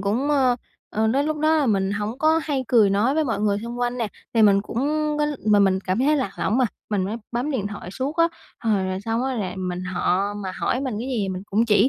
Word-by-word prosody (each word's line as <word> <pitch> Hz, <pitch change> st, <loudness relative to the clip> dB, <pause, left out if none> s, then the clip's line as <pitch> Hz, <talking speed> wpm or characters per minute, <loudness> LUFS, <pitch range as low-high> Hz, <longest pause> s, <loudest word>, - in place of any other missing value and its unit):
cũng, 230 Hz, +9 st, 0 dB
ơ, 260 Hz, -4 st, +3 dB, 0.3 s
ờ, 220 Hz, +1 st, +1 dB
đến 275 Hz, +6 st, +2 dB
lúc 310 Hz, 0 st, -1 dB
đó 310 Hz, +1 st, +3 dB
là 295 Hz, -, +2 dB
mình 195 Hz, -4 st, +1 dB
hổng 210 Hz, +4 st, -3 dB
có 315 Hz, +2 st, +3 dB
hay 275 Hz, -4 st, -1 dB
cười 220 Hz, -5 st, +5 dB
nói 215 Hz, +7 st, +2 dB
với 315 Hz, 0 st, +2 dB
mọi 225 Hz, -6 st, -1 dB
người 205 Hz, -1 st, +1 dB
xung 235 Hz, +1 st, -6 dB
quanh 245 Hz, 0 st, -1 dB
nè, 230 Hz, -3 st, -1 dB, 0.3 s
thì 225 Hz, -, +5 dB
mình 200 Hz, -2 st, +6 dB
cũng 225 Hz, -, -5 dB, 0.4 s
có 295 Hz, -, +2 dB, 0.2 s
mà 210 Hz, -1 st, +5 dB
mình 195 Hz, -1 st, +4 dB
cảm 185 Hz, +1 st, -1 dB
thấy 290 Hz, +4 st, +3 dB
lạc 255 Hz, -9 st, -1 dB
lõng 220 Hz, +6 st, +1 dB
mà, 260 Hz, -, +4 dB, 0.3 s
mình 200 Hz, -3 st, +1 dB
mới 205 Hz, +4 st, -3 dB, 0.2 s
bấm 245 Hz, +5 st, -1 dB
điện 240 Hz, -8 st, -1 dB
thoại 205 Hz, -3 st, -7 dB
suốt 265 Hz, -, -3 dB
á. 335 Hz, 0 st, +4 dB, 0.3 s
Hồi 210 Hz, -4 st, +1 dB
rồi 185 Hz, 0 st, -2 dB
xong 225 Hz, +4 st, -1 dB
á, 265 Hz, -, -1 dB
là 200 Hz, -6 st, -2 dB
mình 180 Hz, -1 st, -3 dB
họ 190 Hz, +2 st, 0 dB
mà 195 Hz, -2 st, -5 dB
hỏi 250 Hz, -, 0 dB
mình 260 Hz, -4 st, -2 dB
cái 245 Hz, +4 st, -4 dB
gì 220 Hz, -7 st, -1 dB
mình 185 Hz, 0 st, -4 dB
cũng 215 Hz, +4 st, +3 dB
chỉ 215 Hz, +3 st, +5 dB
225 Hz, 265 wpm, -23 LUFS, 200-265 Hz, 0.4 s, mình